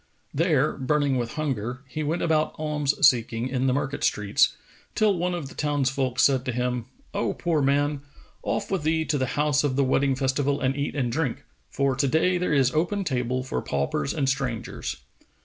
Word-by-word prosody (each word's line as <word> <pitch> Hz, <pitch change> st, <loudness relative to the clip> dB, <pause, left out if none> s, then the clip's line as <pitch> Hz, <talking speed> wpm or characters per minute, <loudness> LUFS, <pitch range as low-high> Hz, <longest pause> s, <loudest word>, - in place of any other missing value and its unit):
There, 155 Hz, -2 st, +2 dB
burning 140 Hz, 0 st, +1 dB
with 120 Hz, -1 st, -3 dB
hunger, 125 Hz, -5 st, -3 dB
he 155 Hz, +4 st, -5 dB
went 155 Hz, +3 st, -1 dB
about 155 Hz, -2 st, +1 dB
alms 150 Hz, -2 st, 0 dB
seeking 115 Hz, -1 st, +1 dB
in 130 Hz, 0 st, 0 dB
the 130 Hz, -, +3 dB
market 140 Hz, +1 st, -2 dB
streets, 105 Hz, -1 st, +2 dB, 0.4 s
till 210 Hz, -2 st, +3 dB
one 180 Hz, +1 st, -1 dB
of 160 Hz, -5 st, -5 dB
the -, -, -11 dB
townsfolk 135 Hz, -3 st, 0 dB
said 135 Hz, -2 st, +4 dB
to 130 Hz, -, -1 dB
him, 125 Hz, -1 st, -2 dB, 0.3 s
"O -, -, -1 dB
poor 165 Hz, -3 st, 0 dB
man, 145 Hz, +1 st, +1 dB, 0.4 s
off -, -, -2 dB
with 190 Hz, -, 0 dB
thee 160 Hz, +1 st, +1 dB
to 145 Hz, -1 st, 0 dB
the 130 Hz, -, 0 dB
house 150 Hz, -1 st, +2 dB
of 140 Hz, -3 st, 0 dB
the 140 Hz, -, +3 dB
wedding 135 Hz, +1 st, +2 dB
festival 140 Hz, +2 st, 0 dB
and 130 Hz, 0 st, 0 dB
eat 145 Hz, +1 st, -2 dB
and 125 Hz, -4 st, 0 dB
drink; 145 Hz, -1 st, -2 dB, 0.3 s
for 140 Hz, -1 st, 0 dB
to 135 Hz, +2 st, +1 dB
day 175 Hz, +6 st, +2 dB
there 180 Hz, -, -1 dB
is 135 Hz, -3 st, +3 dB
open 180 Hz, +6 st, 0 dB
table 125 Hz, -4 st, -1 dB
for 125 Hz, -, -3 dB
paupers 70 Hz, +1 st, -1 dB
and 140 Hz, -3 st, -1 dB
strangers." 125 Hz, -, -2 dB
140 Hz, 190 wpm, -25 LUFS, 130-150 Hz, 0.4 s, said